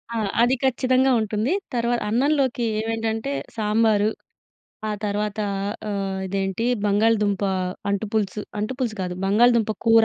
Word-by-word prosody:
ఆ! - - 0 0.2
అది 250 +2 +4
ఖచ్చితంగా 260 0 +3
ఉంటుంది. 215 +4 -1 0.2
తర్వ 235 0 0 0.2
అన్నంలోకి 265 +1 +1 0.2
ఏవేంటంటే, 225 +3 -2 0.2
సాంబారు, 215 -1 +2 0.8
ఆ - - -1
తర్వాతా 210 +1 -1 0.5
ఆహ్, 195 -1 -2
ఇదేంటీ, 195 +2 -2 0.2
బంగాళదుంపా 205 -1 +2 0.4
అంటు 200 +2 -1
పులుసు. 210 -1 -1 0.2
అంటు 215 +4 -2
పులుసు 230 -4 -1
కాదు, 180 -1 -3
బంగాళదుంప 225 +2 +4 0.2
కూర. 225 0 +7
220 Hz, 120 wpm, -23 LUFS, 205-235 Hz, 0.8 s, కూర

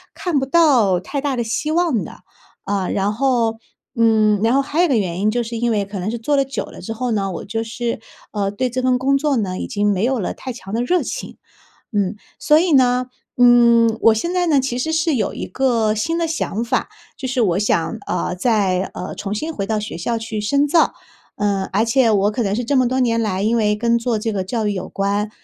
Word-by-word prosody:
看 335 -6 0
不 265 - -3
到 260 - +4
太 275 +9 -4
大 280 -2 -1
的 240 - -1
希 245 +7 -2
望 325 - +1
的。 - - -11 0.4
啊， 195 -2 -1
然 200 +1 0
后 235 -3 +1 0.4
嗯， 215 -3 +3
然 230 +2 +3
后 275 - +4
还 300 +5 -1
有 - - +5
一 - - -1
个 260 - +3
原 185 -3 -1
因， 215 +1 +2
就 240 +1 0
是 230 0 -5
因 235 0 0
为 205 -2 0
可 200 0 -7
能 190 +4 -2
是 235 - -4
做 290 +6 0
了 275 - +2
久 270 -3 -4
了 - - -12
之 225 - -5
后 250 +2 -3
呢， 195 -3 -1
我 170 - -6
就 225 +2 -3
是， 235 0 -3 0.3
呃， 200 -2 -1
对 250 +4 -1
这 255 +1 -3
份 250 -1 +2
工 275 +1 +2
作 285 -2 0
呢 185 -4 -2
已 - - -3
经 205 -2 0
没 195 +2 0
有 255 -1 +1
了 185 - -3
太 255 -2 -6
强 195 -4 -10
的 235 +2 0
热 355 +8 +2
情， - - -6 0.5
嗯。 205 -1 0 0.2
所 300 - +4
以 345 0 +2
呢， 250 -1 +4 0.3
嗯， 235 -2 +5
我 225 -1 +5
现 340 +11 -2
在 355 -1 +1
呢 290 -4 +4
其 255 -1 -2
实 320 +5 -1
是 320 -1 +1
有 240 - 0
一 - - -4
个 230 -5 +1
新 325 +10 -1
的 335 -1 0
想 235 -8 -2
法， 235 - -1 0.3
就 260 - -5
是 255 -1 0
我 190 -3 +2
想 210 +1 0
呃， - - -1
再， 195 -3 +1
呃， 180 - -5
重 205 +1 -4
新 315 +8 -3
回 195 -5 -4
到 215 -1 0
学 210 - -6
校 230 +7 -2
去 225 -1 -4
深 280 +7 +2
造， 325 +3 +3 0.4
呃， 200 -2 -1
而 215 +4 +2
且 230 0 +3
我 205 0 +2
可 240 - -2
能 200 -1 0
是 240 0 -2
这 280 - 0
么 255 -2 +3
多 260 +1 0
年 230 -2 +2
来 195 -2 -1
因 230 +2 +2
为 210 -1 +2
跟 235 +2 +1
做 230 -2 -1
这 220 +1 -2
个 195 -2 -2
教 220 +3 -2
育 205 - 0
有 185 - -5
关， 200 +1 -1
230 Hz, 265 characters per minute, -20 LUFS, 210-260 Hz, 0.5 s, 有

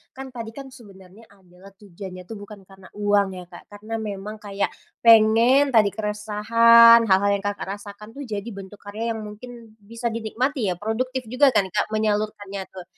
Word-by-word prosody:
kan? 265 0 -8
Tadi 225 -1 -6
kan 275 -1 -8
sebenarnya 200 -4 -16
adalah 185 -1 -19
tujuannya 185 -2 -10
tuh 225 - -7
bukan 205 0 -12
karena 190 -1 -16
uang 205 -1 +2
ya, 180 - -8
Kak, 175 - -12
karena 215 +2 -9
memang 210 0 -6
kayak 200 -1 -3 0.3
pengen 230 +5 +5
tadi 210 -2 +5
keresahan, 230 +2 +5
hal 190 -1 +4
hal 200 - +2
yang, 200 - -6
Kakak 205 -1 -4
rasakan 205 +1 -12
tuh, 285 - -7
jadi 210 0 -5
bentuk 195 +1 -11
karya 220 +3 -4
yang 220 - -6
mungkin 230 +1 -12
bisa 230 +3 -5
dinikmati 230 0 -2
ya. - - -3
Produktif 255 +5 -3
juga 265 +4 +3
kan, 190 - +3
Kak, 210 +1 -1
menyalurkannya 210 -2 -2
tuh. 185 -1 -10
210 Hz, 175 wpm, -23 LUFS, 200-230 Hz, 0.3 s, pengen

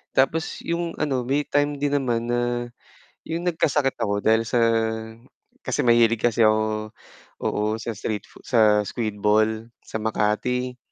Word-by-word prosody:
Tapos 155 +5 +1
yung 170 0 -2
ano 130 -4 0
may 140 +4 +1
time 145 0 0
din 145 0 +2
naman 120 -3 -1
na 120 0 -1 0.6
yung 170 +2 -2
nagkasakit 150 -5 +1
ako 100 -3 -1
dahil 110 +2 +3
sa, 120 +1 0 1.0
kasi - - -1
mahilig 115 -2 +4
kasi 115 -1 +3
ako 110 0 +1 0.5
oo, 105 - -1 0.2
sa 115 -3 -5
street 105 -1 -4
foo - - -18
sa 105 -3 +4
squid 110 0 -3
ball 110 +2 +1
sa - - -7
Makati. 110 +4 -1
120 Hz, 145 wpm, -24 LUFS, 110-135 Hz, 1.0 s, mahilig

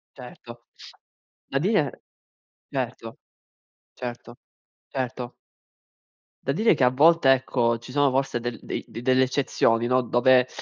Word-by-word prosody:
Certo, 120 -2 -12 0.8
da 135 - -1
dire, 180 - +1 0.8
certo, - - -5 0.8
certo, 120 -1 -8 0.5
certo. 125 -2 -5 1.1
Da 140 - -1
dire 215 +7 +3
che 135 - 0
a 125 - +6
volte 150 +1 +5
ecco 120 -3 +1
ci 120 +3 -12
sono 145 0 +2
forse 135 -2 -1
del 120 0 -5
dei - - -5
de 115 - -8
delle 130 +1 +3
eccezioni, 120 -3 +1
no, 125 +1 +3
dove 125 +1 +3
130 Hz, 125 wpm, -24 LUFS, 120-135 Hz, 1.1 s, a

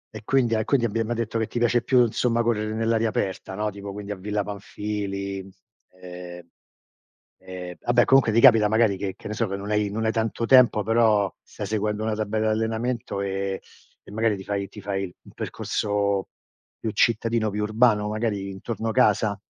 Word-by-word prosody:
e 110 - -6
quindi 125 -3 +2
e 110 -1 +1
quindi 125 0 +2
abbiamo 115 +1 -1
detto 115 0 -2
che 110 - -1
ti - - -6
piace 120 0 +2
più 125 +2 +4
insomma 120 +1 +1
correre 110 -2 -1
nell'aria 115 0 +1
aperta, 95 -2 -3
no, 105 +1 -1
tipo 100 0 -8
quindi 105 0 -7
a - - -2
Villa 105 +2 -2
Panfili, 100 -1 -5 0.5
ehm, 90 -1 -9 0.9
ehm, 90 -1 -8
vabbè 120 0 +3
comunque 135 -4 +5
ti 115 - +3
capita 115 -4 +7
magari 110 -2 +3
che 95 -1 -4
che - - -10
ne 105 - -4
so 115 +1 -1
che 100 - -3
non 100 +2 -6
hai 105 -1 +1
non 110 +2 -2
hai 110 - +2
tanto 115 +1 -1
tempo 125 -4 +5
però 110 -2 +3
stai 105 - -8
seguendo 105 +1 -1
una 110 0 0
tabella 110 +1 -1
d'allenamento 110 0 -2
e 95 0 -2 0.4
e - - -14
magari 110 0 +1
ti 95 - -8
fai 100 0 -2
ti 105 - -11
fai 100 0 -2
il 90 - -15
percorso 100 -2 -1 0.5
più 110 - -3
cittadino, 115 +1 +1
più 105 +1 -2
urbano, 110 -1 +3
magari 105 -3 -2
intorno 110 +3 -4
casa? 110 -3 +3
105 Hz, 185 wpm, -24 LUFS, 100-115 Hz, 0.9 s, capita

